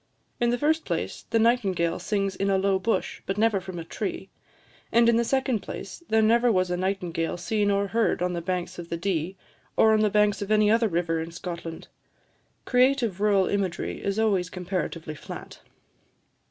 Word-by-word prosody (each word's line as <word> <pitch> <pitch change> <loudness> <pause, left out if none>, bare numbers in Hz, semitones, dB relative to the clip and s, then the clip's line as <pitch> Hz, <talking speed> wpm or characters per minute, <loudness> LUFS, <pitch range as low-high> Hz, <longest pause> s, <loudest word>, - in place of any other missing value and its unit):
In 240 -1 +2
the 245 - +1
first 315 +4 +1
place, - - -4
the 230 - +2
nightingale 195 -8 +2
sings 195 -2 -1
in 195 +1 -1
a 195 - +3
low 190 0 +2
bush, 225 +4 -1
but 195 - -2
never 215 -3 +2
from 185 -1 -7
a 165 - -4
tree; - - -5 0.6
and, 235 0 +5
in 235 - +5
the 235 - +3
second 260 -1 0
place, - - -8
there 220 0 +4
never 235 +2 +4
was 185 -3 +1
a - - +1
nightingale 175 -3 -2
seen 205 +3 0
or 200 0 +1
heard 225 -5 +1
on 180 0 0
the 170 - -3
banks 180 0 -3
of 170 -1 -8
the 170 - -2
Dee, 180 0 -2 0.4
or 220 0 +6
on 215 - +3
the 215 0 +3
banks 210 0 +2
of 200 - -4
any 215 -1 +4
other 225 0 +3
river 165 -3 0
in 165 - -5
Scotland. 170 -1 -7 0.8
Creative 250 -6 +2
rural 200 -2 +4
imagery 190 -4 -2
is 200 +1 -1
always 200 -5 +1
comparatively 180 -4 -4
flat." 150 - -9
200 Hz, 190 wpm, -26 LUFS, 180-220 Hz, 0.8 s, or